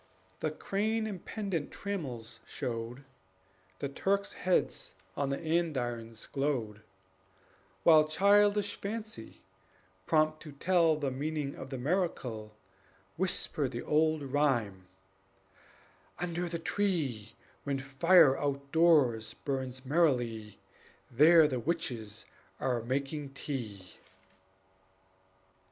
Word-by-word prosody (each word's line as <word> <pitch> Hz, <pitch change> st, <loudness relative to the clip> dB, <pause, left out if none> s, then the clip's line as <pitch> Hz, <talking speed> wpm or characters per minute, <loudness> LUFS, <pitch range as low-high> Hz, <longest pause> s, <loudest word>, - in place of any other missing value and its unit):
The 155 Hz, -, 0 dB
crane 215 Hz, +8 st, -1 dB
and 200 Hz, -5 st, -5 dB
pendent 195 Hz, -8 st, -3 dB
trammels 125 Hz, -, -5 dB
showed, 120 Hz, +3 st, -5 dB, 0.7 s
The 140 Hz, -, -3 dB
Turks' 195 Hz, +8 st, -1 dB
heads 180 Hz, 0 st, 0 dB, 0.2 s
on 140 Hz, -1 st, -1 dB
the 140 Hz, -, -1 dB
andirons 125 Hz, -9 st, -2 dB
glowed; 125 Hz, -7 st, -2 dB, 1.0 s
While 155 Hz, -2 st, +7 dB
childish 205 Hz, +4 st, +3 dB
fancy, 215 Hz, -, -6 dB, 0.6 s
prompt 155 Hz, -1 st, +2 dB
to 150 Hz, -3 st, -10 dB
tell 165 Hz, +1 st, +3 dB
The 145 Hz, -3 st, -2 dB
meaning 145 Hz, +1 st, -3 dB
of 130 Hz, -, -9 dB
the 135 Hz, -, -4 dB
miracle, 125 Hz, -, -2 dB, 0.6 s
Whispered 160 Hz, -6 st, 0 dB
the 120 Hz, -, -4 dB
old 155 Hz, 0 st, +2 dB
rhyme: 125 Hz, -10 st, 0 dB, 1.3 s
"Under 175 Hz, 0 st, -2 dB
the 170 Hz, -, -2 dB
tree, 155 Hz, -, -1 dB, 0.3 s
When 140 Hz, -1 st, -1 dB
fire 135 Hz, +3 st, +5 dB
outdoors 140 Hz, -5 st, +2 dB
burns 130 Hz, -1 st, -4 dB
merrily, 120 Hz, -, +1 dB, 0.5 s
There 155 Hz, +5 st, +7 dB
the 130 Hz, -4 st, -2 dB
witches 120 Hz, -9 st, -3 dB, 0.3 s
are 125 Hz, -3 st, 0 dB
making 135 Hz, +3 st, -3 dB
tea." 110 Hz, -10 st, -6 dB
145 Hz, 100 wpm, -31 LUFS, 125-170 Hz, 1.3 s, While